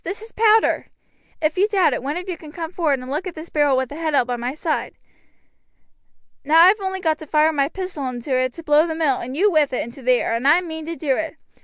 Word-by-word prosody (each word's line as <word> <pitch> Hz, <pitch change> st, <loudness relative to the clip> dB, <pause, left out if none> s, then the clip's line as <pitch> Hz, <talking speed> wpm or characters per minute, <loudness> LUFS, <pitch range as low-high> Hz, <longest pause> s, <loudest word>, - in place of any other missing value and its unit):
This 390 Hz, +5 st, -5 dB
is 450 Hz, -, -12 dB
powder. 440 Hz, 0 st, +3 dB, 0.6 s
If 310 Hz, +3 st, 0 dB
you 405 Hz, -, +4 dB
doubt 395 Hz, -4 st, +2 dB
it, -, -, -3 dB
one 285 Hz, +5 st, -3 dB
of 360 Hz, +2 st, -6 dB
you 365 Hz, -, -3 dB
can 310 Hz, -2 st, -12 dB
come 325 Hz, 0 st, -6 dB
forward 315 Hz, -6 st, 0 dB
and 255 Hz, +1 st, -8 dB
look 315 Hz, +7 st, -3 dB
at 355 Hz, -, -7 dB
this 315 Hz, +2 st, -9 dB
barrel 290 Hz, -3 st, +2 dB
with 260 Hz, -1 st, -1 dB
the 290 Hz, -, -8 dB
head 315 Hz, -2 st, -1 dB
out 255 Hz, -, +3 dB
by 245 Hz, 0 st, -2 dB
my 245 Hz, +3 st, -4 dB
side. 310 Hz, 0 st, -3 dB, 1.5 s
Now 305 Hz, +3 st, +3 dB
I 345 Hz, +2 st, +9 dB
have 410 Hz, +1 st, +1 dB
only 380 Hz, 0 st, -3 dB
got 320 Hz, -4 st, 0 dB
to 315 Hz, -, -10 dB
fire 310 Hz, +2 st, +3 dB
my 280 Hz, -1 st, +1 dB
pistol 360 Hz, -7 st, -5 dB
into 250 Hz, +2 st, -5 dB
it 255 Hz, 0 st, +1 dB
to 330 Hz, -, -10 dB
blow 305 Hz, +1 st, +4 dB
the 320 Hz, -, -3 dB
mill, 300 Hz, -5 st, +1 dB
and 255 Hz, +4 st, -6 dB
you 405 Hz, +4 st, +3 dB
with 300 Hz, -5 st, +2 dB
it, -, -, -1 dB
into 235 Hz, +4 st, -11 dB
the 255 Hz, 0 st, +3 dB
air, 240 Hz, -, 0 dB
and 235 Hz, +4 st, 0 dB
I 320 Hz, +5 st, +5 dB
mean 320 Hz, -2 st, -7 dB
to 335 Hz, -, -4 dB
do 285 Hz, -5 st, -1 dB
it. 320 Hz, +1 st, -4 dB
310 Hz, 275 wpm, -21 LUFS, 275-350 Hz, 1.5 s, I